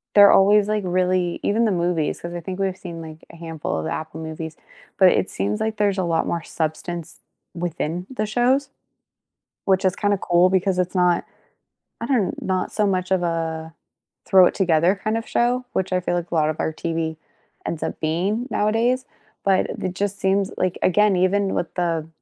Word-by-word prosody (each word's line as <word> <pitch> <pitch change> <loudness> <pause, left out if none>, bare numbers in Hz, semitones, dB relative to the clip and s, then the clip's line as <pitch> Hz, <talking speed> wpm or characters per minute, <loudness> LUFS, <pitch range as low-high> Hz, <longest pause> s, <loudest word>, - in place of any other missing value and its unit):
They're 205 -1 +9
always, 205 +1 +5
like, 215 -1 0
really 180 -1 0
even 225 +3 +2
the 215 - +2
movies, 170 -3 0
'cause 170 0 -6
I 175 - -4
think 185 +3 -6
we've 190 -1 -1
seen, 170 -3 -8
like, 160 -1 -10
a - - -12
handful 165 - -4
of 80 - -3
the 80 - -2
Apple 160 +1 -5
movies, 160 0 -6 0.4
but 190 - +7
it 185 - +1
seems 100 +2 -2
like 220 -1 -1
there's 205 -2 +1
a 185 - +1
lot 165 -1 0
more 170 -1 -2
substance 160 +1 -4 0.3
within 170 +1 -3
the 215 -5 -2
shows, 255 +5 +1 0.9
which 190 -1 +2
is 185 0 +2
kinda 205 -1 +1
cool 175 +1 +3
because 190 0 +1
it's 180 +1 0
not 180 -1 +2 0.8
I 230 - -3
don't 235 -8 0
not 185 -1 -1
so 210 - +1
much 185 -2 0
of 185 -2 +2
a 160 -1 -3 0.5
throw 190 -3 +7
it - - +2
together 175 -1 +3
kind 215 +3 -2
of 225 - -5
show, 250 +1 +1
which 190 0 -1
I 185 - +3
feel 180 - -2
like 175 -1 -3
a - - -1
lot 155 -1 +3
of 155 - -3
our - - 0
TV 165 -1 -3 0.5
ends 165 - -3
up - - -4
being 190 +10 -1
nowadays, 235 +5 +1 0.4
but 190 -1 +2
it - - -6
it 185 -1 -2
just 200 0 -2
seems 195 0 +1
like 185 -1 0
again, 205 +1 +4
even 190 +2 +2
with 175 - -2
the 165 -3 -1
185 Hz, 200 wpm, -22 LUFS, 165-200 Hz, 0.9 s, They're